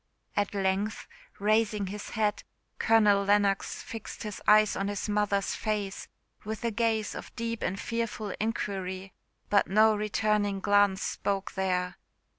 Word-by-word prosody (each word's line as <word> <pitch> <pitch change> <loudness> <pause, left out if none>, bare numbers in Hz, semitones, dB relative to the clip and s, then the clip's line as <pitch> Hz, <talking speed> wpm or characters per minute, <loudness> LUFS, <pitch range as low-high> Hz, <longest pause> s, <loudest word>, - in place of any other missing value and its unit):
At 205 0 0
length, 195 +2 0 0.3
raising 210 0 +2
his 205 +2 -6
head, 210 -2 0 0.4
Colonel 210 -3 +4
Lennox 200 -1 +1
fixed 225 0 -7
his 210 -2 -6
eyes 215 0 +6
on 195 +1 -1
his 205 +1 -3
mother's 205 -1 +1
face 210 -3 -3 0.4
with 220 +2 -5
a 230 - +1
gaze 225 -1 0
of - - -9
deep 230 -1 -3
and 195 +2 -2
fearful 230 -3 -3
inquiry; 195 -3 -3 0.4
but 200 - +4
no 215 +2 +5
returning 210 -1 0
glance 200 -1 +3
spoke 195 -1 -2
there. 180 -1 -1
205 Hz, 135 wpm, -29 LUFS, 195-215 Hz, 0.4 s, eyes